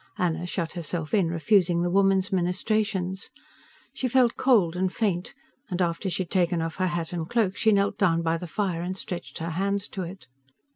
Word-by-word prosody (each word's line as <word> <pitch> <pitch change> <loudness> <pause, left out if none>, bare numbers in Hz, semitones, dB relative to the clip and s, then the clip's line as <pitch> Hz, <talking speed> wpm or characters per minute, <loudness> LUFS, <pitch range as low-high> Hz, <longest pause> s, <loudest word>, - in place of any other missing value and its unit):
Anna 175 -1 -1
shut 170 -2 -2
herself 165 -2 -3
in, 195 -6 +3
refusing 175 +1 +2
the 175 - 0
woman's 195 0 +3
ministrations. 190 +1 -1 0.6
She 260 - -1
felt 250 -1 +3
cold 205 -11 +3
and 185 0 0
faint, 190 0 -1 0.3
and 180 -1 -3
after 175 +2 0
she 185 - 0
had 170 - -15
taken 175 -2 +2
off 165 -1 -3
her 185 -1 +1
hat 175 -1 -3
and 165 -2 -3
cloak 215 -5 +1
she 220 - +3
knelt 200 0 +1
down 170 -4 +3
by 165 0 +1
the 180 +1 -7
fire 185 -2 -1
and 185 +2 -3
stretched 180 -2 -6
her 165 +1 -3
hands 200 +4 -1
to 195 - -5
it. 185 +2 -7
180 Hz, 195 wpm, -26 LUFS, 170-200 Hz, 0.6 s, in